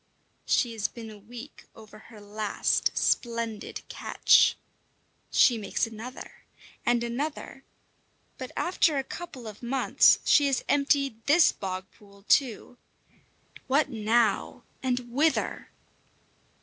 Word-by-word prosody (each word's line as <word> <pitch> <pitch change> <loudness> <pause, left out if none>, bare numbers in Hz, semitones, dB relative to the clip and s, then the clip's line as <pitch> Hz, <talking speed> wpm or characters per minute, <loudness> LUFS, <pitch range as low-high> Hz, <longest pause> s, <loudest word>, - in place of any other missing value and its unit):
She 240 -3 +1
has 215 -2 -1
been 225 -2 -10
a 210 - -12
week 240 +6 -12
over 215 -1 -14
her 220 0 -15
last 205 0 -1
splendid 230 -3 -2
catch. - - +3 0.7
She 240 -3 +4
makes 205 - -1
another 225 +3 -10 0.4
and 240 -1 +1
another; 270 +3 -5 0.8
but - - -6
after 340 -4 +1
a 270 - 0
couple 270 -5 -9
of 210 -1 -10
months 255 +2 +4
she 290 -2 +5
has 270 -2 -1
emptied 275 -5 +1
this 315 +3 +6
bog 185 -1 -5
pool 200 -2 -20
too. 245 -2 +1 0.9
What 280 +2 +2
now, 220 -1 0 0.2
and 250 -2 -2
whither? 305 +4 0
235 Hz, 115 wpm, -27 LUFS, 215-275 Hz, 0.9 s, this